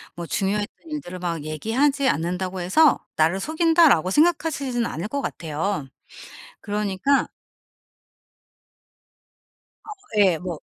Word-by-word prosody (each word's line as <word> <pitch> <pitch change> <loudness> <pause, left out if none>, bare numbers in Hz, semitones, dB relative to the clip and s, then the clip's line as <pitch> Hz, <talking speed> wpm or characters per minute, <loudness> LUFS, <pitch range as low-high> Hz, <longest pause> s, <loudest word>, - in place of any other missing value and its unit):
뭐 170 0 -6
중요했던 205 +3 -1 0.2
일들을 185 -12 -6
막 170 -3 -3
얘기하지 260 - 0
않는다고 180 +3 -2
해서 280 - +4 0.2
나를 160 +5 +2
속인다라고 320 - +3
생각하시지는 290 - +1
않을 170 +6 -4
것 280 +5 -3
같아요. 160 - -3 0.7
그러니까 205 +6 0 2.6
어 430 - -10 0.3
예 185 -4 +4
뭐. 170 -1 -6
200 Hz, 250 characters per minute, -23 LUFS, 175-280 Hz, 2.6 s, 해서